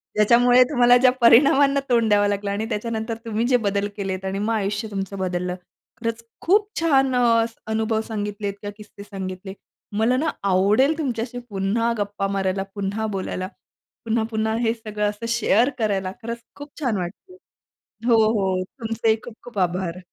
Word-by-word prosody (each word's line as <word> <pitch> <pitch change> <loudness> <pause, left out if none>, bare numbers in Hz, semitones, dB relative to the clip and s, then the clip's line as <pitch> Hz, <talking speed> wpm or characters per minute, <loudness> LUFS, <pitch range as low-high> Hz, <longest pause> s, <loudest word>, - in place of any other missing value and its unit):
ज्याच्यामुळे 245 +4 +5
तुम्हाला 245 -3 +5
ज्या 255 0 +5
परिणामांना 275 +4 +6
तोंड 230 -2 +3
द्यावं 205 0 +4
लागलं 200 0 -2
आणि 210 +2 -2
त्याच्यानंतर 225 +1 -3
तुम्ही 225 +1 -1
जे 250 -1 +4
बदल 200 0 0
केलेत 190 -1 -3
आणि 195 +1 -2
मग 225 +2 0
आयुष्य 205 +1 -1
तुमचं 195 0 -4
बदललं. 180 -1 -2 0.4
खरंच 230 0 -3 0.2
खूप 410 +4 +3
छान 270 -5 +3
अ, - - +3 0.2
असं 230 0 -7
अनुभव 220 0 0
सांगितलेत 205 -2 -3
किंवा 205 0 -5
किस्से 210 -1 -12
सांगितले 190 -1 -7 0.4
मला 240 +4 +2
ना 320 +4 0
आवडेल 205 - +3
तुमच्याशी 245 -4 -3
पुन्हा 205 +4 0
गप्पा 205 -1 -2
मारायला 195 -1 -1
पुन्हा 200 +2 -2
बोलायला 185 0 -4 0.6
पुन्हा-पुन्हा 220 -1 0
हे 225 -1 +2
सगळं 210 -2 -2
असं 210 +3 -7
शेअर 235 +2 +3
करायला. 195 -4 -1
खरंच 235 +1 -5 0.2
खूप 290 0 -10
छान 235 -7 0
वाटतं. 200 - -7 0.7
हो, 235 -2 +5 0.2
हो. 190 -3 0 0.2
तुमचेही 225 0 +1
खूप-खूप 235 -2 -10
आभार. 180 -1 -1
220 Hz, 155 wpm, -23 LUFS, 200-235 Hz, 0.7 s, परिणामांना